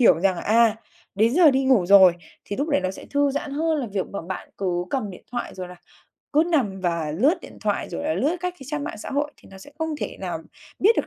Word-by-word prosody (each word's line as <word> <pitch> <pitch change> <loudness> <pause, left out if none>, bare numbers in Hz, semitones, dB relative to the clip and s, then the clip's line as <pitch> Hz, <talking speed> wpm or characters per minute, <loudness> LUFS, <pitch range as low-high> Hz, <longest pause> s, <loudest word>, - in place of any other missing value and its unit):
hiểu 230 -8 +6
rằng 190 -2 +2
là, - - -5
à, 225 0 +4 0.4
đến 225 +5 +3
giờ 340 -3 +7
đi 265 0 +1
ngủ 250 -9 +4
rồi, 190 -2 +8 0.3
thì 200 - -5
lúc 290 +3 -1
đấy 290 - +2
nó 185 0 -1
sẽ 190 - -10
thư 285 0 +2
giãn 285 +1 -3
hơn 315 +2 0
là 255 - -2
việc 195 -2 -1
mà 200 - -4
bạn 185 +2 -6
cứ 180 -2 -1
cầm 220 -7 -1
điện 180 - -12
thoại, 240 - -4
rồi 185 -1 -6
là 180 - -11 0.6
cứ 305 - +6
nằm 210 -11 +1
và 170 -4 -1
lướt 265 - +2
điện - - -12
thoại, - - -1
rồi - - -4
là 310 +1 0
lướt 310 +7 +1
các 360 0 -2
cái 270 - -11
trang 295 +1 -3
mạng 215 - -6
xã - - -7
hội, 290 +1 -1
thì - - -18
nó 190 - -11
sẽ 285 - -13
không 320 -2 -2
thể - - -4
nào - - -3 0.4
biết 445 +4 +4
được - - 0
240 Hz, 270 wpm, -24 LUFS, 190-295 Hz, 0.6 s, rồi